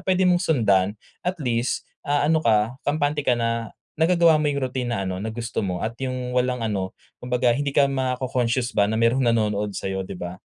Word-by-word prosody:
pwede 185 0 +2
mong 180 0 +3
sundan 100 -7 +3 0.4
at 180 - +1
least, 120 -1 0 0.3
ah, 145 0 +2
ano 160 - +4
ka 115 -1 +2
kampante 145 0 +1
ka 125 - +4
na 115 -1 -2 0.2
nagagawa 165 0 +4
mo 150 - 0
yung 140 - -2
routine 125 -2 -2
na 100 -4 -2
ano 95 - -3
na 110 - -3
gusto 115 0 -3
mo 90 -2 -2
at 110 +4 -3
yung 130 -1 -3
walang 125 -1 +1
ano 100 -4 -2 0.3
kumbaga 125 0 +1
hindi 140 +2 -1
ka 140 -1 +4
maco-conscious 130 -2 -1
ba 100 - +5
na 110 - 0
merong 120 +3 +3
nanonood 105 -3 +1
sayo, 95 0 -3
'di 95 - -7
ba? 90 +1 -5
125 Hz, 200 wpm, -23 LUFS, 110-140 Hz, 0.4 s, ba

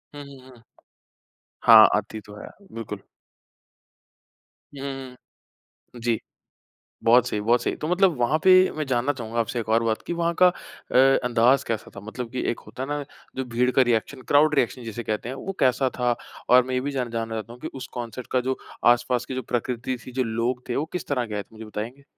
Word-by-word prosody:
हुँ, 145 - -7
हुँ, 130 -2 -14
हुँ। 125 -3 -17 1.0
हाँ, 110 -2 +10
आती 105 +1 -4
तो 105 0 -14
है - - -8 0.3
बिल्कुल। 105 -3 -6 1.8
हुँ, 135 - -8
हुँ, 135 -2 -6 0.8
हुँ। 120 - -10
जी। 115 -2 0 0.9
बहुत 120 +1 +5
सही, 105 - -2
बहुत 120 +3 +2
सही। - - -1
तो 155 - -4
मतलब 180 -3 +3
वहाँ 120 +6 +2
पे 190 - +7 0.3
मैं 155 - -1
जानना 130 +2 +1
चाहूँगा 115 -3 -6
आपसे 115 +2 -2
एक 110 - -7
और 115 +1 +3
बात 110 -1 -1
कि - - -3
वहाँ 170 0 0
का - - +10
अ, 180 - -9 0.3
अंदाज़ 125 +3 +3
कैसा 110 -2 -3
था? - - -7
मतलब 115 +3 -7
कि 130 - -2
एक 120 - -4
होता 130 - -7
है 135 - -4
ना 145 0 -2 0.3
जो 130 - -2
भीड़ 125 +1 +1
का 130 - +4
रिएक्शन 120 +3 -1
क्राउड 150 +1 +5
रिएक्शन 125 -2 0
जिसे 115 +1 -5
कहते 110 +1 -3
हैं 130 - -5
वो 195 +8 -5
कैसा 130 0 +3
था? 120 -1 +2 0.3
और 125 0 +7
मैं 130 - -3
ये 125 - +1
भी 140 +2 -3
जान 125 -3 -2
जानना 115 -1 -3
चाहता 110 +1 -5
हूँ 120 - -13
कि - - -5
उस 130 -1 -6
कॉन्सर्ट 120 0 -6
का 130 - +3
जो 130 +1 -2 0.3
आस-पास 120 0 -1
की 130 - -5
जो 130 - -3
प्रकृति 125 +1 -2
थी, 130 - -9
जो 130 - 0
लोग 115 +3 -2
थे। 120 - -2
वो 150 - 0
किस 180 - -4
तरह 125 -4 0
के 105 - -6
आए 105 - -2
थे - - -31
मुझे 110 0 -10
बताएँगे? 115 +6 -7
125 Hz, 220 wpm, -24 LUFS, 115-130 Hz, 1.8 s, हाँ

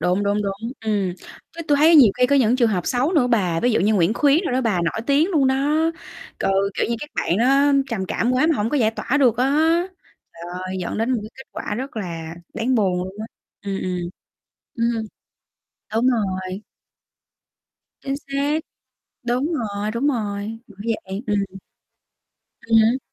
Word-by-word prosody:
đúng, 180 +3 +1
đúng, 205 +1 +1
đúng. 200 +4 -4
Ừm, 205 -5 -1 0.4
chứ 335 0 -7
tui 290 - +4
thấy 320 +3 +6
nhiều 235 -9 +7
khi 250 - +5
có 280 - +3
những 250 -2 +3
trường 235 -3 +3
hợp 180 -4 -1
xấu 260 +7 +1
nữa 280 -7 +3
bà, 185 -9 +1
ví 245 - +2
dụ - - +2
như 210 +3 +3
Nguyễn 190 +3 +2
Khuyến 290 +2 +4
đồ - - -1
đó 260 - +1
bà, 210 -8 +1
nổi 170 +6 -1
tiếng 295 +6 +3
luôn 290 -6 +3
đó, 265 - +2 0.8
ừ, - - 0 0.2
kiểu - - 0
như, 235 - -1
các 295 - -7
bạn 175 - 0
đó 275 +4 +4 0.2
trầm 205 -5 -2
cảm 240 +6 0
quá 255 +4 +3
mà 320 -2 +2
hổng 210 +2 -1
có 295 - +1
giải 220 -4 +3
tỏa 240 +4 -2
được 245 -4 +4
á. 250 +3 +2 0.9
Trời 170 0 -13 0.2
ơi, 190 0 -4
dẫn 175 - -3
đến 230 +3 0
một 245 - +1
cái 215 - -9
kết 265 - -13
quả 210 - -4
rất 260 +2 -6
là 165 -5 -5 0.2
đáng 255 +3 0
buồn 190 -5 +2
luôn 190 +1 -8
á, 220 - -4 0.4
ừm, 195 -1 -3
ừm. 180 -1 -2 0.8
Ừm, 230 -1 0 0.9
đúng 230 +3 +2
rồi. 190 -5 -1 1.4
Chính 275 - -2
xác, 280 +3 0 0.7
đúng 255 +7 0
rồi, 210 -6 -2
đúng 235 +5 -1
rồi, 215 -4 -2
bởi 205 -2 -18 0.3
vậy, 195 +4 -5
ừm. 205 -1 +1 1.2
Ừm 225 0 +1
hứm. 225 +4 +4
225 Hz, 190 wpm, -22 LUFS, 200-260 Hz, 1.4 s, nhiều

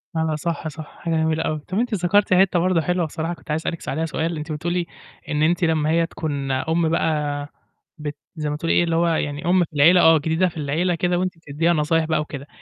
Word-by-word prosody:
لا، - - 0
لا، 160 -1 0
صح، 165 +1 -3
صح، 155 0 -7
حاجة 165 -1 -2
جميلة 160 0 +1
أوي. 155 -1 -1
طَب 185 +7 -4
أنتِ 240 -1 -1
ذكرتِ 190 +1 +2
حتّة 185 -1 +4
برضه 180 -1 +2
حلوة 180 +1 0
بصراحة 160 +2 -3
كنت 170 - -9
عايز 155 +1 0
أسألِك 170 0 -4
عليها 160 +4 -1
سؤال، 165 +1 -2
أنتِ 155 +2 -6
بتقولي 175 +3 -2 0.4
إن 150 -1 0
أنتِ 175 +3 +2
لمّا 160 -2 +2
هي 165 +1 +3
تكون 145 -5 -4
أُمّ 160 +5 +1
بقى 150 -3 -1 0.5
بت 150 -1 -5 0.2
زي 150 -2 -3
ما 145 - -2
بتقولي 165 +2 -1
إيه - - +4
اللي 165 -1 0
هو 170 +1 +2
يعني 150 -2 -1
أُمّ 180 +1 +4
في 165 - -9
العيلة 165 +5 +6
آه، 160 0 +7
جديدة 160 +4 +1
في 165 - -13
العيلة 160 +5 0
كده 175 +1 0
وأنتِ 185 -2 -2
بتديها 165 +2 0
نصايح 160 +1 +1
بقى 155 -1 0
وكده. 140 -2 -7
160 Hz, 235 wpm, -22 LUFS, 150-175 Hz, 0.5 s, آه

